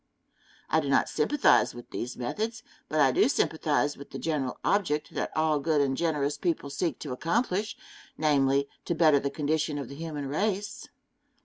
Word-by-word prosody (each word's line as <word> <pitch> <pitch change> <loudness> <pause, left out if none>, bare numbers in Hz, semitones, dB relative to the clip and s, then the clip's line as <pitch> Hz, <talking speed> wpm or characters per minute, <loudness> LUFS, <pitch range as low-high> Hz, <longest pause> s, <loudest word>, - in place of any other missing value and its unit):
I - - +3
do - - -2
not - - +3
sympathize 295 - +3
with 120 - -11
these 125 +1 -5
methods, 220 - -3 0.3
but 155 - 0
I 135 -3 +5
do 215 - +3
sympathize 150 - +1
with 140 - -11
the - - -7
general 145 -6 -2
object 165 -7 +1
that - - -2
all 155 -1 +2
good 155 +1 +1
and 135 -2 +1
generous 150 -3 0
people 165 -5 -1
seek 165 +4 -1
to 145 - -5
accomplish 200 - -1 0.4
namely, 140 -2 +2 0.2
to 170 - -1
better 155 -3 +5
the 140 - -2
condition 150 +1 -1
of 140 -4 -5
the 140 - -8
human 150 -2 -5
race. 200 +7 -2
150 Hz, 175 wpm, -28 LUFS, 140-170 Hz, 0.4 s, I